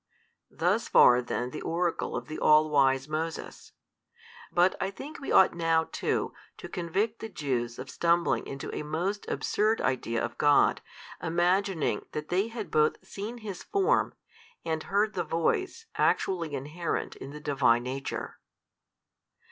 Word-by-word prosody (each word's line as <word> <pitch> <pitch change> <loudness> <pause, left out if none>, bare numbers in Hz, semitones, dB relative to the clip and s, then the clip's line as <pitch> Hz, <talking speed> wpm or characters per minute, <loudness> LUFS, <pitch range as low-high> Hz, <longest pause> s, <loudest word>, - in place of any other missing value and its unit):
Thus - - 0
far 125 0 +6
then 125 0 -3
the - - -6
oracle 170 +1 -1
of - - -4
the 155 - -6
all 155 0 +5
wise 135 -1 +3
Moses: 160 +2 -5 0.8
but 180 +2 +4
I 190 - 0
think 270 +10 -9
we 275 - -5
ought 190 - +6
now 165 -1 +1
too - - -1 0.2
to - - -8
convict 200 +5 -2
the 225 - -6
Jews 120 - -2
of 130 - -7
stumbling 170 0 +1
into 135 0 -6
a - - -3
most 170 +7 -3
absurd 215 +2 +1
idea 115 -3 0
of 120 - -9
God, 145 -1 +4 0.4
imagining 175 +1 +1
that 150 0 -5
they 190 +4 +1
had 220 -7 -6
both 155 0 +3
seen 215 +5 -6
His 195 -4 -5
Form, 400 +4 +1 0.5
and 160 -1 -1
heard 205 +4 +1
the - - -1
Voice 370 - -1
actually 170 -6 +1
inherent 155 +5 -3
in 135 - -8
the 150 +1 -8
Divine 130 -5 +2
Nature. 130 +2 -5
165 Hz, 150 wpm, -28 LUFS, 145-195 Hz, 0.8 s, far